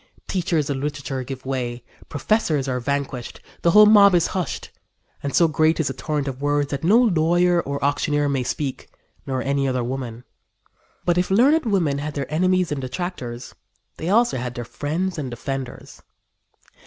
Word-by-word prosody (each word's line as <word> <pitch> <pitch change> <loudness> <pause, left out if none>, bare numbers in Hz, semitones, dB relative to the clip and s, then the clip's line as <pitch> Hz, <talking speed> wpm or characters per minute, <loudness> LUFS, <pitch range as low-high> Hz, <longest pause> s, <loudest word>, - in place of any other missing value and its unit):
Teachers 170 -5 0
of 140 - -1
literature 140 -2 -3
give 130 0 -8
way, 125 -2 -3 0.3
professors 150 -4 0
are 125 -1 -1
vanquished, 135 -1 -3 0.2
the 170 - +3
whole 210 +4 +8
mob 200 -3 +7
is 170 - +3
hushed, 185 -2 -3 0.5
and 140 - -3
so 170 - +5
great 155 +1 +2
is 150 -5 +1
the - - -3
torrent 145 +2 -3
of 135 0 -5
words 145 0 0
that 140 0 -3
no 200 +7 +5
lawyer 175 -5 +3
or 140 -2 -4
auctioneer 145 +1 +1
may 140 -2 0
speak, 135 +2 -4 0.4
nor 130 -1 -2
any 140 0 0
other 130 -2 0
woman." 125 -2 -5 0.8
But 175 0 +2
if 180 - 0
learned 265 +8 +4
women 165 -9 +1
had 150 +1 -5
their 140 +1 -4
enemies 185 +1 +2
and 145 -2 -2
detractors 130 -4 -5 0.4
they 165 - -3
also 235 - +3
had 125 0 -5
friends 170 +4 -3
and 135 -4 -4
defenders. 130 +1 -6
145 Hz, 165 wpm, -22 LUFS, 135-175 Hz, 0.8 s, whole